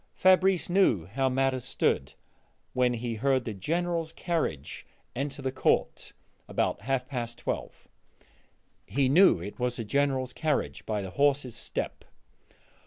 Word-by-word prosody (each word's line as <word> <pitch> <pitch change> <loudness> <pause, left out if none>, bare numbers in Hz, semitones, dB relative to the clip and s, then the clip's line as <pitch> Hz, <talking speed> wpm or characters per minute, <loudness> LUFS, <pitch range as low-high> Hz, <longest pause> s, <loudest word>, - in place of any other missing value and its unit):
Fabrice 185 -1 +4
knew 175 - +3
how 130 +8 0
matters 130 -1 +1
stood 65 - 0 0.6
when 125 -1 +2
he 120 0 -3
heard 130 +2 +1
the 110 - -3
General's 165 - -1
carriage 160 - -3 0.3
enter 140 +2 -4
the 130 - -1
court 130 - 0 0.3
about - - -1
half 130 +2 -1
past 120 -3 -4
twelve; - - -5 1.0
he 135 +1 +1
knew 165 - +6
it 100 +7 -8
was 125 0 0
the 115 - -4
General's 135 0 0
carriage 155 -3 -2
by 105 -2 -1
the 95 - -6
horses' 140 -2 +1
step. - - -4
130 Hz, 135 wpm, -28 LUFS, 120-145 Hz, 1.0 s, knew